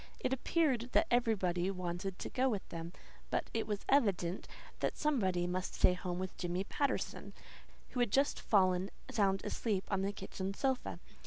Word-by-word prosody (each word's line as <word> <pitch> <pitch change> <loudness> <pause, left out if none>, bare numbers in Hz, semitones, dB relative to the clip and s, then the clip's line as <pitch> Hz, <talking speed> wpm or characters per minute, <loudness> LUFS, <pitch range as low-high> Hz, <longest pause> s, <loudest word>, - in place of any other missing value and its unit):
It 260 - 0
appeared 265 -3 +1
that - - +5
everybody 195 -7 +2
wanted 185 0 -3
to - - -5
go 260 +1 +2
with 205 -5 -2
them; 165 0 -5 0.4
but - - -1
it 225 - -1
was 210 -2 -3
evident 195 -9 +2 0.3
that - - -1
somebody 190 -13 +1
must 180 +1 -2
stay 180 - +5
home 180 -1 -3
with 185 0 -4
Jimmy 175 +1 -1
Patterson, 280 +7 -2 0.6
who 250 - -4
had 240 -3 +3
just 275 +7 +2
fallen 185 -2 +3 0.2
sound 195 -3 +2
asleep 205 -5 0
on 195 -1 +2
the 195 +1 0
kitchen 195 -1 -5
sofa. 265 +1 0
195 Hz, 165 wpm, -35 LUFS, 180-240 Hz, 0.6 s, that